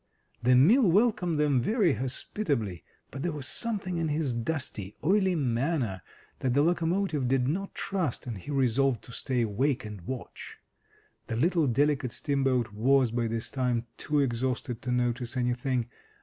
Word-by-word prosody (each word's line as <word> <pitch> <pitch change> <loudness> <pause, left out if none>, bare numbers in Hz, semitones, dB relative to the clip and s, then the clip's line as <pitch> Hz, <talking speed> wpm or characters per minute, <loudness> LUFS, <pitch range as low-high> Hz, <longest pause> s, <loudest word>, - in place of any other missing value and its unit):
The 125 +1 +4
mill 200 - +6
welcomed 180 -5 +2
them 145 -4 +3
very 200 - +2
hospitably, 125 - -2 0.3
but 135 - -6
there 175 - -1
was 145 -3 -5
something 195 - -1
in 165 - 0
his 150 -3 0
dusty, 115 -5 -3
oily 190 +2 +3
manner 125 - 0 0.4
that 130 -1 0
the 145 - +4
locomotive 170 -3 +1
did 125 -1 +2
not 195 +7 -2
trust, 185 -10 -2
and 120 -3 -4
he 95 - -11
resolved 135 -3 +1
to - - -12
stay 125 0 -1
awake 125 +4 0
and 105 -3 -7
watch. 125 +7 -7 0.7
The 115 - -3
little 165 +4 +2
delicate 135 0 +1
steamboat 135 -6 0
was, 130 +3 +3
by 120 0 0
this 115 0 -3
time, 125 -3 0
too 150 -1 +1
exhausted 125 -1 -2
to 125 - -3
notice 125 0 -1
anything. 125 0 0
135 Hz, 155 wpm, -28 LUFS, 120-160 Hz, 0.7 s, mill